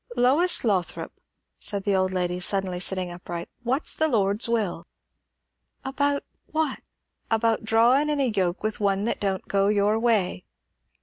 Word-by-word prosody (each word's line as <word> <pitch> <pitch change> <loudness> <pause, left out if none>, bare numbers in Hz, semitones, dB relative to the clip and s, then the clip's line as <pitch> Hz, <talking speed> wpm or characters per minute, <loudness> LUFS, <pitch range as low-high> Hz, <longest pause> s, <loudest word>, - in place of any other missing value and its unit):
"Lois 280 +9 +4
Lothrop," 195 -7 -1 0.5
said 200 -1 -3
the 200 -1 +1
old 185 0 +1
lady, 180 -1 -1
suddenly 185 -1 0
sitting 185 -1 -2
upright, 175 -1 -7
"what's 255 +5 +2
the 315 - +1
Lord's 210 -3 +1
will?" 205 -8 -1 1.0
"About 285 +1 0 0.2
what?" 310 -3 -1 0.5
"About 225 0 +1
drawin' 235 +7 +3
in 295 -1 0
a 260 -4 +1
yoke 180 -1 -1
with 215 0 -2
one 200 -1 +1
that 235 - -1
don't 195 -2 -2
go 195 0 +1
your 210 +1 +2
way?" 215 - +1
210 Hz, 145 wpm, -25 LUFS, 190-245 Hz, 1.0 s, Lois